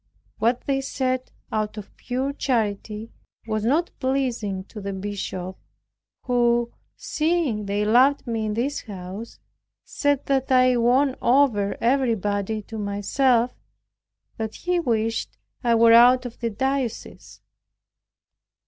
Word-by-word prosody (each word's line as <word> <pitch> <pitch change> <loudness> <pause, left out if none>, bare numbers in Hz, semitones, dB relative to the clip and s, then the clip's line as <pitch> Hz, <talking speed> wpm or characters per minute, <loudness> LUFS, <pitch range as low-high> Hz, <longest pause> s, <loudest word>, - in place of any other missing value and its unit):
What 235 +3 +1
they 270 -1 -1
said 255 -1 -2 0.2
out 215 0 -2
of 210 - -9
pure 260 +3 -3
charity 220 -4 -2 0.3
was 215 -1 -2
not 305 +9 +1
pleasing 245 -8 -1
to 210 +2 -10
the 200 0 -4
Bishop, 190 -2 -5 0.7
who, 240 -1 +1 0.2
seeing 305 -10 -1
they 205 +1 0
loved 255 +6 +4
me 225 -3 -2
in 210 - -2
this 275 +5 -1
house, 195 +2 -8 0.5
said, 285 -1 0
that 270 -1 0
I 255 -1 +5
won 255 +3 +3
over 240 -6 +3
everybody 220 -5 0
to 220 +2 -7
myself 230 +5 +1 0.9
and 220 0 -1
that - - -17
he 355 0 -1
wished 225 -6 -1 0.3
I 235 -1 +3
were 230 0 +6
out 250 +2 +7
of 240 -1 -8
the 235 - -1
diocese. 265 +2 -3
235 Hz, 125 wpm, -24 LUFS, 210-260 Hz, 0.9 s, out